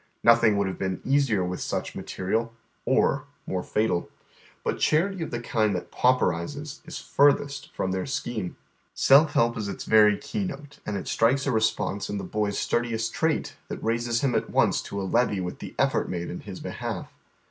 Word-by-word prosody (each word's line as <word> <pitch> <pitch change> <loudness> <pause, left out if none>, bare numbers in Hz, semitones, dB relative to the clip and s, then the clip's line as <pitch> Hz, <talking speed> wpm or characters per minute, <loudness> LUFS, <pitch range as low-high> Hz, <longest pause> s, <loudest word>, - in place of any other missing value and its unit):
Nothing 115 -3 +5
would 100 - +2
have 95 - -5
been 95 -1 -2
easier 135 -8 +2
witii 90 0 -3
such - - -3
inatei 95 +1 -5
iai, 115 +1 +1 0.4
or - - +2 0.2
more 90 - -2
fatal. 105 -5 0 0.5
But - - -1
charity 185 +4 +2
of 160 - -3
the 120 - -3
kind 110 -4 +1
that 90 - -5
pauperizes 130 - 0
is - - -6
furthest 140 0 +2
from 95 - -1
their 95 +5 -2
scheme. 115 -8 -3 0.4
Self 145 +4 +6
help 115 0 +3
is 105 - -3
its - - -5
very 105 -2 +6
key 210 - -3
note, 145 -6 -7
and 105 - -1
it 95 - -6
strikes 130 +4 +2
a 140 - +1
response 110 -3 0
in 105 - -2
the - - -4
boy's 105 -1 -1
stui 120 0 0
diest 115 0 -2
trait 160 -1 0
that - - -6
raises 115 +1 0
iiiin 130 -4 +2
at - - -2
once - - +2
to 100 - -5
a - - -2
leve! 105 -2 +1
with 90 - -5
the - - -8
effort - - +1
made 85 -1 -3
in 90 - -5
his 100 -4 -8
behalf. - - -5
115 Hz, 195 wpm, -26 LUFS, 100-135 Hz, 0.5 s, Self